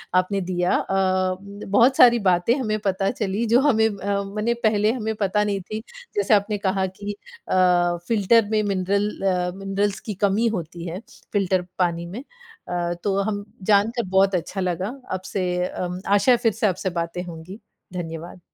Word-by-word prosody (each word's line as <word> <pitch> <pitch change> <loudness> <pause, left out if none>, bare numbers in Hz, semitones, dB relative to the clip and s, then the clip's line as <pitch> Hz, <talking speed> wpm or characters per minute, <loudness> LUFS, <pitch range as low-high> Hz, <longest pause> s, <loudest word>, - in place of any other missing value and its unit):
आपने 190 +2 +2
दिया। 180 0 0
अ, 185 -1 +1 0.3
बहुत 235 +7 +4
सारी 240 -1 +7
बातें 175 +7 +2
हमें 215 -4 -1
पता 195 0 +1
चली 210 +2 -2
जो 235 +3 +4
हमें 220 -6 +4
अ, 200 0 -2
मने 210 +4 -1
पहले 215 0 +3
हमें 220 -3 -2
पता 210 0 +1
नहीं 200 -2 -1
थी। 215 +4 -5 0.4
जैसे 350 - +2
आपने 205 +1 +2
कहा 190 -1 0
कि 200 +2 -6 0.3
अ, - - +1 0.5
फ़िल्टर 225 0 +4
में 215 -1 +3
मिनरल 200 +1 0 0.2
अ 180 -1 +1
मिनरल्स 195 +1 -1
की 215 - -5
कमी 210 +4 +2
होती 170 +1 -7
है 175 +3 -5 0.3
फ़िल्टर 190 -2 +2 0.2
पानी 170 -1 0
में। 210 +10 -7 0.4
अ, 175 -1 -1
तो 195 -1 +1
हम 205 -1 -2 0.3
जानकर 225 +4 +3
बहुत 190 0 +3
अच्छा 185 +3 -3
लगा 185 +2 -1 0.2
आपसे 185 +1 -3 0.7
आशा 230 +5 +4
है 240 - +6
फ़िर 230 -2 +2
से 215 - +1
आपसे 190 0 -1
बातें 170 +1 -3
होंगी। 175 +4 -9 0.3
धन्यवाद। 170 0 -6
195 Hz, 165 wpm, -23 LUFS, 185-215 Hz, 0.7 s, सारी